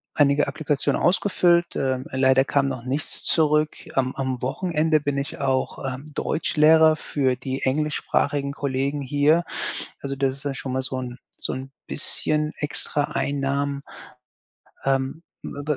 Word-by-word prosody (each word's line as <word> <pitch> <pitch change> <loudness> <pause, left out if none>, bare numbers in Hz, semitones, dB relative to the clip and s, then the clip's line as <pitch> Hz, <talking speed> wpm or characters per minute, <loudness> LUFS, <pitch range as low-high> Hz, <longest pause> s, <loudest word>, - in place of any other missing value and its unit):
einige 145 0 +4
Applikationen 145 0 0
ausgefüllt, 175 -2 +3
ähm, 130 -1 -1
leider 130 0 +4
kam 140 0 +1
noch 130 -3 -4
nichts 135 +4 -2
zurück. 150 -1 +3 0.2
Am 130 -1 +1
am 130 -2 -2
Wochenende 155 +3 +1
bin 145 -1 -2
ich 140 +2 -4
auch, 135 -1 0
ähm, 135 +3 -5
Deutschlehrer 160 +1 +4
für 135 -4 0
die 130 +1 -4
englischsprachigen 140 0 0
Kollegen 140 +1 -1
hier. 145 +5 +3 0.6
Also, 140 0 -3
das 135 -1 0
ist 135 - -7
ja 140 - -1
schon 135 -1 -5
mal 130 - 0
so 130 0 -3
'n 125 -1 -6 0.2
so - - -3
'n 130 +1 -6 0.2
bisschen 150 +1 0
extra 145 0 -2
Einnahmen. 140 0 -1 1.0
Ähm, 135 +4 0 0.2
wa 145 - -6
140 Hz, 140 wpm, -24 LUFS, 135-150 Hz, 1.0 s, einige